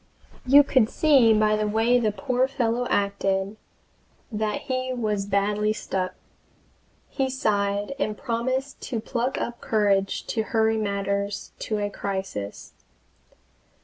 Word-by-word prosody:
You 285 +3 +8
could 260 -5 +3
see 275 -7 +5
by 215 0 +4
the 215 0 0
way 225 +4 +3
the 220 -3 +1
poor 250 +6 0
fellow 245 -2 -1
acted 200 0 0 0.8
that 215 -1 -2
he 255 0 -2
was 210 -5 -1
badly 205 +1 +1
stuck. 185 -3 -3 0.9
He 265 -2 -1
sighed, 205 -4 0
and 215 -6 -1
promised 260 +3 -2
to 235 - -1
pluck 240 +3 -2
up 235 0 -4
courage 200 -3 +1
to 225 - -1
hurry 220 0 +1
matters 200 -1 -2
to 215 - -2
a 205 0 -2
crisis. 190 - -5
215 Hz, 125 wpm, -25 LUFS, 200-245 Hz, 0.9 s, You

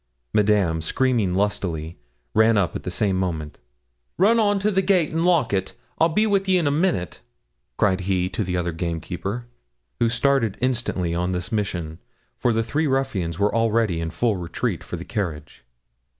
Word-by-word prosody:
Madame, 100 -6 +2
screaming 115 -1 +1
lustily, 85 -6 -2 0.3
ran 110 0 +4
up 95 -4 +1
at - - -3
the - - -5
same 95 +1 0
moment. 80 -5 -3 0.6
'Run 220 +6 +4
on 205 -2 +3
to 205 +2 +1
the 190 -1 +2
gate 185 -5 +2
and 165 +1 0
lock 165 - +2
it 95 -1 -1 0.2
I'll 165 - +4
be 210 +7 +2
wi' 200 -2 +2
ye 190 -1 +3
in 170 - +1
a 145 - +2
minute,' 150 - 0 0.6
cried 95 -2 +2
he 90 -1 0
to 100 +3 -2
the 90 -1 -2
other 85 -1 -1
gamekeeper; 85 +7 -4 0.5
who 115 - +3
started 125 -3 +1
instantly 120 -9 -1
on 90 +2 -1
this 90 0 -3
mission, 85 -7 -2 0.4
for 120 - +2
the 115 0 +1
three 150 +8 0
ruffians 130 - -1
were 100 +2 +1
already 115 -6 +1
in 80 - -2
full 105 +6 0
retreat 85 -2 -3
for - - -6
the - - -7
carriage. 75 -10 -4
105 Hz, 180 wpm, -23 LUFS, 90-135 Hz, 0.6 s, ran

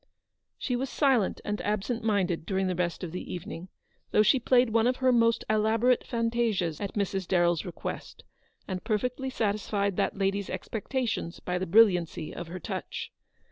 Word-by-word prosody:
She 250 - -2
was 260 +2 -2
silent 265 -9 +2
and 210 0 -2
absent 215 +3 -2
minded 195 -6 +1
during 190 -1 0
the 185 - 0
rest 175 0 -2
of 170 - -4
the 180 - -6
evening, 175 +1 -6 0.4
though 210 - +4
she 215 +5 +4
played 245 -1 +3
one 225 +1 +3
of 250 - +2
her 260 0 +3
most 230 -1 +3
elaborate 220 +3 +2
fantasias 230 -8 0
at 200 - -4
Mrs. 195 -3 -1
Darrell's 175 -3 +2
request, 175 - -6 0.4
and 185 -2 -4
perfectly 250 +4 -1
satisfied 205 -4 -1
that - - 0
lady's 195 0 0
expectations 215 -1 -3
by 180 0 -2
the 185 - -3
brilliancy 180 -5 +3
of 175 - -6
her 180 +2 -6
touch. - - -5
205 Hz, 165 wpm, -28 LUFS, 180-230 Hz, 0.4 s, though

